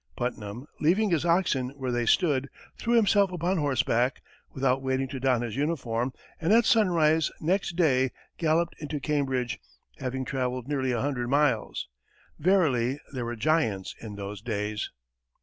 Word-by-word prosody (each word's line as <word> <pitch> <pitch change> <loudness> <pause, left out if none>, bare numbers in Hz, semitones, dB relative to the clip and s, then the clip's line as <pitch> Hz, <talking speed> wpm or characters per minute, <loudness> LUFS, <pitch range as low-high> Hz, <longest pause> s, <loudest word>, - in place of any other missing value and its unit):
Putnam, 120 0 -4
leaving 190 +7 +3
his 165 -1 +1
oxen 170 -7 +2
where 130 -2 -2
they 120 -1 0
stood, 140 -7 +2 0.3
threw 235 0 0
himself 205 -3 +4
upon 180 +1 0
horseback, 130 -3 +1 0.3
without 135 0 +1
waiting 130 0 0
to 130 - -5
don 125 -2 +2
his 115 -3 -4
uniform, 130 -5 -1 0.3
and 165 +4 +1
at 230 +1 +6
sunrise 165 -7 +3
next 180 +2 0
day, 130 -7 +3 0.3
galloped 165 +1 +2
into 150 -1 -4
Cambridge, 135 -4 -1 0.4
having 130 0 -3
travelled 125 -1 -2
nearly 135 -3 0
a 120 -2 0
hundred 130 -4 -1
miles! 140 -5 +1 0.5
Verily 145 -8 +2
there 125 -3 -3
were 120 0 -3
giants 115 - 0
in 110 -3 -7
those 100 0 -6
days! 105 -2 -3
135 Hz, 150 wpm, -27 LUFS, 125-165 Hz, 0.5 s, at